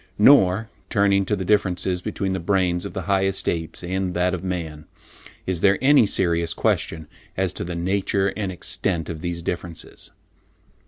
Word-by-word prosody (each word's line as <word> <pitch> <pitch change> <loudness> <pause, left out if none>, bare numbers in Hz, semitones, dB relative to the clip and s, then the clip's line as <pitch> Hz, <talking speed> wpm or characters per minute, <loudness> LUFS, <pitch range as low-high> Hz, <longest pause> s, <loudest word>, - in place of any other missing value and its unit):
Nor, 110 -3 +5 0.2
turning 100 -2 +3
to 105 - 0
the 95 -2 -4
differences 90 -3 +1
between 95 +1 -2
the 95 - -2
brains 90 -1 0
of - - -6
the 95 - -4
highest 95 -1 0
apes 80 +1 -2
and 90 0 -2
that 90 +1 +1
of 90 -1 -4
man, 80 -5 -4 0.6
is 90 -3 -2
there 100 -1 +4
any 135 -4 +5
serious 85 -4 0
question 80 -1 0 0.3
as 95 -1 0
to - - -5
the 85 0 -5
nature 95 +2 0
and 100 -3 -3
extent 90 -1 -1
of 80 -2 -6
these 85 0 -4
differences. 85 -2 -6
95 Hz, 165 wpm, -23 LUFS, 85-100 Hz, 0.6 s, Nor